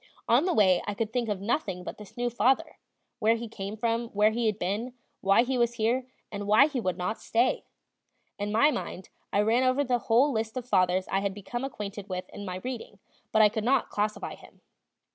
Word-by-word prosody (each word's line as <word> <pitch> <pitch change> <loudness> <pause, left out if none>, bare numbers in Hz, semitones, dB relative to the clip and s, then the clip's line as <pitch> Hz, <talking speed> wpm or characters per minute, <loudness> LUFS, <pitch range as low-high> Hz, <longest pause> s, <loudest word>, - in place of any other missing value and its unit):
On 245 +8 +4
the 370 - +1
way 190 -5 +4
I 205 - -2
could 220 +1 -3
think 240 -3 0
of 200 -2 -2
nothing 200 - -1
but - - -7
this 210 +2 -13
new 245 0 0
father, 255 +3 +1 0.4
where 225 +2 +4
he 230 0 -5
came 210 -1 -6
from, 230 +1 0
where 210 0 +3
he 230 +1 0
had 210 -2 0
been, 215 +7 -3 0.2
why 195 +4 +4
he 255 0 -1
was 235 0 +2
here, 240 +3 0 0.2
and 205 0 -5
why 215 +6 +7
he 285 -4 -3
would 185 -4 -1
not 180 +5 -3
stay. 235 +3 +1 0.7
In 205 +1 -2
my 260 +8 +4
mind 190 - -5 0.2
I 205 - +3
ran 225 +4 +3
over 260 +2 +2
the 250 -2 +1
whole 255 +6 +5
list 220 0 -2
of 250 -1 -5
fathers 185 -3 +2
I 195 - +2
had 195 -1 -2
become 240 +5 -5
acquainted 205 -6 -6
with 185 -1 -4
in 205 - -8
my 180 -1 -4
reading, 245 -5 -6 0.3
but 220 - +5
I 210 - +7
could 220 0 -3
not 255 +2 +2
classify 210 +1 -2
him. - - -16
220 Hz, 220 wpm, -28 LUFS, 200-240 Hz, 0.7 s, why